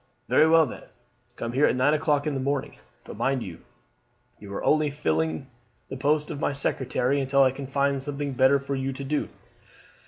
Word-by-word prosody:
"Very 155 - +5
well, 165 0 +6
then, 125 - -9 0.5
come 115 0 -5
here 140 +4 +4
at - - +1
nine 130 +4 +3
o'clock 150 -2 +1
in 150 - -1
the 135 - -2
morning. 140 +1 -2 0.2
But - - -10
mind 135 -3 0
you 85 -4 -9 0.9
are 100 - -4
only 155 -1 +3
filling 80 - -1 0.4
the - - -5
post 150 +3 0
of 145 - -5
my 145 - 0
secretary 135 0 0
until 135 +1 +3
I 130 - +4
can 135 +1 -7
find 140 0 0
something 140 0 -4
better 130 +2 +4
for 140 0 -5
you 135 0 -2
to 140 - -7
do." 145 +2 -2
140 Hz, 190 wpm, -26 LUFS, 130-145 Hz, 0.9 s, well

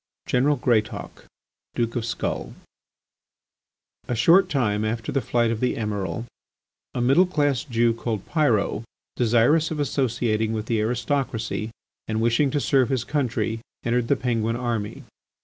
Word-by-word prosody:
GENERAL 135 +4 +2
GREATAUK, 115 -5 -1 0.5
DUKE 115 -1 -1
OF 120 -2 -1
SKULL 115 - -3 1.5
A 120 - -1
short 165 - +5
time 110 -7 +1
after 110 +1 -2
the 135 - 0
flight 120 -2 +1
of 115 - -2
the 125 - 0
Emiral, 105 +1 -3 0.7
a 120 - 0
middle 135 +10 +4
class 145 -6 +1
Jew 120 -3 +2
called 115 -3 -4
Pyrot, 120 -9 +1 0.3
desirous 120 +7 +3
of 155 - -4
associating 115 -5 0
with 110 -1 -3
the 115 -1 0
aristocracy 115 -2 -1 0.4
and 110 0 -1
wishing 120 +5 +2
to 145 - 0
serve 135 -2 +2
his 130 -3 0
country, 115 -5 -1 0.3
entered 120 0 +1
the 140 - +3
Penguin 115 -3 -1
army. 115 -4 -3
120 Hz, 140 wpm, -24 LUFS, 110-135 Hz, 1.5 s, short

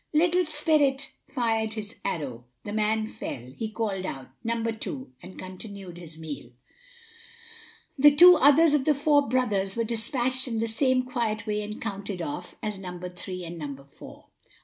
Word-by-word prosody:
Little 350 +3 +4
spirit 295 -3 +2 0.2
fired 225 -4 0
his 215 -1 -6
arrow 125 -7 -3 0.2
the 205 - -5
man 215 0 +1
fell 130 - -7
he 220 +5 -3
called 215 -4 -2
out, 135 -8 -5
"Number 230 0 0
two," 140 -12 -6
and 185 - -11
continued 185 -1 -8
his 160 -2 -11
meal. 155 -5 -7 1.5
The 290 +1 +8
two 355 +3 +10
others 300 +1 +6
of 285 -3 +2
the 300 - +4
four 285 -2 +3
brothers 205 -6 +1
were 230 - +1
despatched 250 +3 -1
in 230 -2 -2
the 225 +1 0
same 255 +3 +2
quiet 230 -4 -2
way 210 -1 -1
and 210 +1 -6
counted 200 -3 -4
off 175 +2 -5
as 210 -2 -3
"Number 180 -1 -6
three" 180 0 -6
and 170 0 -7
"Number 140 -2 -6
four." 140 - -14
220 Hz, 165 wpm, -27 LUFS, 185-260 Hz, 1.5 s, two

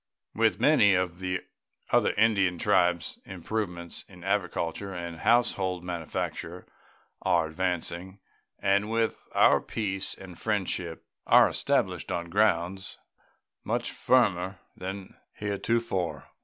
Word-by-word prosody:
With - - +2
many 100 -2 +5
of 90 -1 -1
the 95 -1 -2 0.5
other - - +4
Indian 100 -5 +3
tribes 90 -4 +2
improvements 90 -2 -4
in 90 -3 -14
agriculture 95 -1 -1
and 85 -2 -6
household 95 -4 +2
manufacture 85 0 -4 0.6
are 85 -2 +2
advancing, 90 +2 -3 0.4
and 100 +2 +1
with 115 0 -1
all - - +4
our - - +6
peace 100 -3 -2
and 95 -3 -11
friendship 95 -5 -2 0.2
are - - +7
established - - 0
on 85 0 -3
grounds 95 -2 +1 0.7
much - - -1
firmer 95 -7 +2 0.2
than 95 +1 -7 0.2
heretofore. 100 -5 -2
95 Hz, 110 wpm, -28 LUFS, 85-100 Hz, 0.7 s, are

